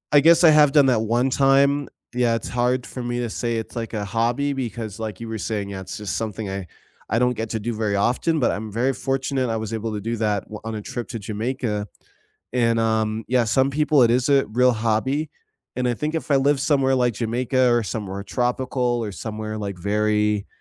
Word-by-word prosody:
I - - +9
guess 165 +4 +5
I 160 - +8
have 150 -2 +6
done 145 -3 +6
that 120 -4 +3
one 120 +4 +1
time. 140 +1 +3 0.2
Yeah, 120 -2 +2
it's - - -4
hard 125 +1 0
for 125 - -7
me 120 0 -2
to 115 -3 -3
say 120 -1 -2
it's, 110 - -6
like, 115 -1 -4
a 105 -1 -2
hobby 120 +7 0
because, 115 -5 -5
like, 110 -4 -5
you 115 - -6
were 110 -1 -4
saying, 105 -1 -3
yeah, 95 -1 -6
it's 95 - -7
just 105 -2 -4
something 110 -2 -4
I 95 -2 -5 0.4
I 115 - +1
don't 125 0 +2
get 115 -1 -4
to 110 - -1
do 115 +2 -3
very 105 -2 -1
often, 125 +10 +1
but 125 - +2
I'm 110 0 -5
very 125 +5 +1
fortunate 135 -1 -1
I 115 - -1
was 110 0 -5
able 110 0 -3
to 105 - -3
do 115 +3 -3
that 105 -3 0
w 105 - -8
on 110 0 -4
a 105 - -4
trip 120 +3 -5
to 115 - -5
Jamaica, 110 0 -3 0.7
and, 115 -2 +2
um, 110 -1 0
yeah, 125 -1 +3
some 130 +4 +2
people 150 -1 +3
it 115 - +3
is 125 +2 +1
a 140 -4 +4
real 125 +4 +3
hobby, 115 +7 0 0.5
and 125 - 0
I 120 - +1
think 150 +6 -3
if 160 -2 -3
I 140 - +5
live 140 +1 +3
somewhere 135 -3 +2
like 125 -2 +1
Jamaica 125 +3 +1
or 120 -1 +3
somewhere 100 -1 -4
tropical 125 +1 -1
or 105 - -4
somewhere, 110 +1 -5
like, 100 -3 -4
very, 105 +2 0
115 Hz, 225 wpm, -23 LUFS, 110-130 Hz, 0.7 s, I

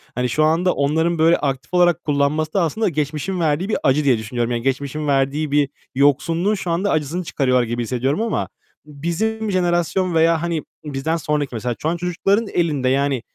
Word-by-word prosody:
hani, 125 0 0
şu 155 +6 +1
anda 165 +4 +2
onların 160 +4 +1
böyle 165 +2 +4
aktif 135 +2 -3
olarak 175 -1 +3
kullanması 150 +2 0
da 195 - +2
aslında 180 +6 0
geçmişin 155 +4 -2
verdiği 165 +5 0
bir - - +1
acı 140 +3 +3
diye 125 -4 +4
düşünüyorum. 120 +2 -3
Yani, 120 - -1
geçmişin 140 +3 -2
verdiği 140 +2 0
bir 145 -1 +2 0.3
yoksunluğun 165 +8 +2
şu 180 -3 -4
anda 185 +5 0
acısını 155 +4 -1
çıkarıyorlar 130 -5 +1
gibi 120 +1 -2
hissediyorum 130 - -1
ama 225 -1 -1 0.4
bizim 195 +9 -2
jenerasyon 175 0 +1
veya, 165 0 +3
hani, 170 -3 -2 0.2
bizden 150 +3 -2
sonraki 150 -5 -2
mesela 120 +2 -2
şu 155 - 0
an 170 - -1
çocukların 195 +5 0
elinde, 150 -7 +1
yani, 135 -1 +1
155 Hz, 180 wpm, -20 LUFS, 135-175 Hz, 0.4 s, böyle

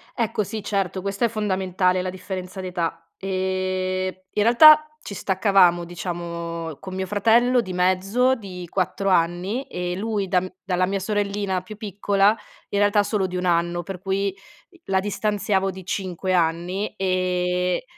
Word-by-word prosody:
Ecco 230 -2 0
sì, 210 +2 -5
certo, 195 -2 -1
questa 200 +4 -1
è - - +4
fondamentale, 190 -4 0
la 185 - -3
differenza 185 0 -6
di 185 - -5
età. 170 -2 -3
Ehm, 185 0 -1 0.2
in 210 - +2
realtà 305 +6 +8
ci 200 - -7
staccavamo, 185 -3 +3
diciamo, 170 -2 -5
con 190 -1 -8
mio 190 0 -3
fratello 235 +5 +3
di 185 -5 -6
mezzo 190 +8 +2
di 185 -6 -8
4 190 +2 -1
anni 180 +7 +1
e 180 0 -4
lui 205 0 -2
da 180 0 +3
m 185 0 -7
dalla 185 -1 +1
mia 195 +1 -1
sorellina 200 -1 -1
più 200 +3 -10
piccola 205 0 +2 0.3
in 200 - -1
realtà 205 0 +4
solo 205 -1 0
di 185 0 -3
1 180 - -2
anno. 175 0 +1
Per 190 +2 -7
cui, 195 +2 -1 0.4
i 350 -2 -23
la 190 -1 +1
distanziavo 200 -1 0
di 190 0 -10
5 185 -1 -2
anni 175 +5 0
e 180 -1 0
190 Hz, 160 wpm, -23 LUFS, 180-205 Hz, 0.4 s, realtà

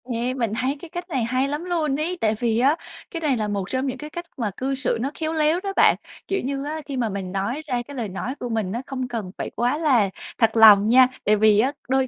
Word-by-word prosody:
Yeah, 245 +2 -1
mình 230 -4 -1
thấy 260 +5 -1
cái 345 - -9
cách 350 +2 -6
này 265 -7 0
hay 255 +4 0
lắm 295 +3 -3
luôn 330 -6 0
ấy. 345 +4 -2
Tại 215 -1 +2
vì 230 -2 +1
á 275 +5 +4 0.4
cái 335 - -5
này 285 -5 +1
là 215 -1 -1
một 200 -2 -3
trong 260 +1 -1
những 260 - -3
cái 300 - -8
cách 345 +2 -6
mà 225 -5 -1
cư 270 +1 -1
xử 260 -3 -1
nó 270 +3 -1
khéo 315 0 -1
léo 315 +2 +2
đó 395 -1 -3
bạn. - - +5 0.3
Kiểu 390 - -1
như 275 +1 -2
á, 310 +2 -4
khi 280 -3 -5
mà 235 -3 0
mình 190 -2 -5
nói 200 +10 -2
ra 250 -3 -1
cái 280 +3 -10
lời 225 -4 -3
nói 230 +8 -4
của 245 - -4
mình 220 -5 -1
á, 235 +4 -3
không 260 -2 -4
cần 225 -6 -5
phải - - -4
quá 245 +5 +1
là 260 -11 +3 0.3
thật 225 -1 +2
lòng 210 -2 +8
nha. 255 +2 +7 0.2
Tại 210 - +4
vì 210 0 +4
á 260 +5 +3 0.2
đôi 265 0 +2
255 Hz, 275 wpm, -23 LUFS, 225-295 Hz, 0.4 s, lòng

